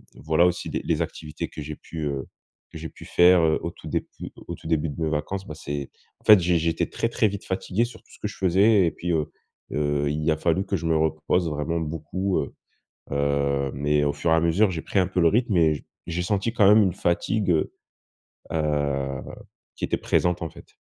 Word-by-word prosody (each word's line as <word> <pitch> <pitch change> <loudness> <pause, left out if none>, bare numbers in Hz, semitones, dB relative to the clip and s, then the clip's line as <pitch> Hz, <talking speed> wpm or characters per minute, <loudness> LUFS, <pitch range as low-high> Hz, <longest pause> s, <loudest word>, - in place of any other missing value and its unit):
voilà, 80 +3 +2
aussi 90 - -2
des - - -2
les - - +1
activités 75 -1 -6
que 75 - -8
j'ai 75 +1 -6
pu, 80 - -8
heu, 70 -2 -3 0.4
que - - -8
j'ai - - -5
pu - - -14
faire, 90 0 +5
heu, 80 -1 +3
au - - -3
tout - - -12
déput - - -4 0.2
au 85 - -4
tout - - -11
début 80 0 +1
de 75 +3 -7
mes 80 - +1
vacances, 85 +6 -3
bah, 75 - -7
c'est 70 -2 -5 0.3
en - - -29
fait, 105 -2 +9
j'é 90 0 +2
j'étais 80 0 0
très, 115 - -1
très 110 - +2
vite 100 0 -6
fatigué 95 +3 -1
sur 120 - -11
tout - - -25
ce - - -16
que 105 - -2
je 105 - -9
faisais 95 +2 +4
et - - 0
puis, 90 0 -4
heu 80 -3 0 0.4
heu, 75 -1 0
il 75 +2 -1
a 80 - +1
fallu 85 +4 +1
que 95 -1 -1
je 85 - -6
me 80 - +2
repose 80 +2 +1
vraiment 75 +3 -2
beaucoup, 80 +5 -2
heu - - -4 0.6
heu, 70 -1 +1
mais 75 +1 +1
au 70 - +1
fur 80 - -1
et - - +6
à 80 - +4
mesure, 85 +5 +3
j'ai 85 -3 -4
pris - - -1
un 90 - +2
peu 95 - 0
le 85 - +6
rythme 110 0 +1
et 80 -3 +2 0.2
j'ai 85 +1 -2
senti 100 +4 0
quand 110 -4 +4
même 105 +1 +7
une 95 -4 +1
fatigue, 95 +3 0
heu 80 - 0 0.8
heu 70 -4 -1 0.5
qui - - -2
était - - -1
présente, 90 -1 +1
en 80 - -3
fait. - - -16
80 Hz, 230 wpm, -25 LUFS, 75-95 Hz, 0.8 s, fait